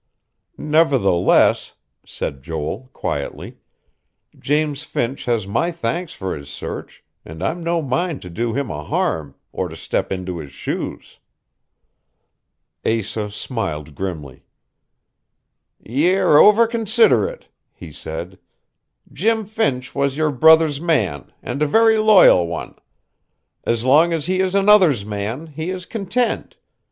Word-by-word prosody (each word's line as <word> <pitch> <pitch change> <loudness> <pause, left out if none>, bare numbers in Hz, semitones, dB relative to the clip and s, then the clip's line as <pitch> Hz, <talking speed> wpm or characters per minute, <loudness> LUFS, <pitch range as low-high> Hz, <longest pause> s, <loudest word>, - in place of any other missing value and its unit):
"Nevertheless," 140 - +2 0.3
said 70 -1 -6
Joel 80 - -5
quietly, 70 - -5 0.8
"James 150 0 0
Finch 135 -3 -3
has 115 -4 0
my 115 - -1
thanks 170 +3 -3
for 95 -1 -4
his 70 -1 -10
search; 70 - -8 0.2
and 80 +3 -9
I'm 170 - -2
no 170 -1 0
mind 145 +4 -2
to 90 - -8
do 115 +6 -2
him 135 0 -3
a 75 - -5
harm, 75 -1 -2 0.2
or - - -3
to - - -9
step - - -3
into 90 -2 -4
his 70 -3 -9
shoes." - - -6 1.6
Asa 110 -1 -2
smiled 80 - -5
grimly. 80 -6 -6 1.4
"Ye're 165 - +3
over 210 +3 +7
considerate," 230 - +1 0.2
he - - -12
said. - - -7 0.7
"Jim 225 -1 0
Finch 190 - -2
was 140 0 -1
your 155 -1 +1
brother's 160 +1 +5
man, 110 - -1
and 140 - -4
a 150 - +3
very 225 +6 +4
loyal 200 - +6
one. 85 - -6 0.9
As 115 0 0
long 155 +6 +5
as 160 -3 -2
he 185 +1 0
is 190 0 0
another's 195 - +4
man, 105 +8 -4
he 160 +2 -6
is 185 -1 -5
content. 225 +3 -2
140 Hz, 125 wpm, -20 LUFS, -, 1.6 s, over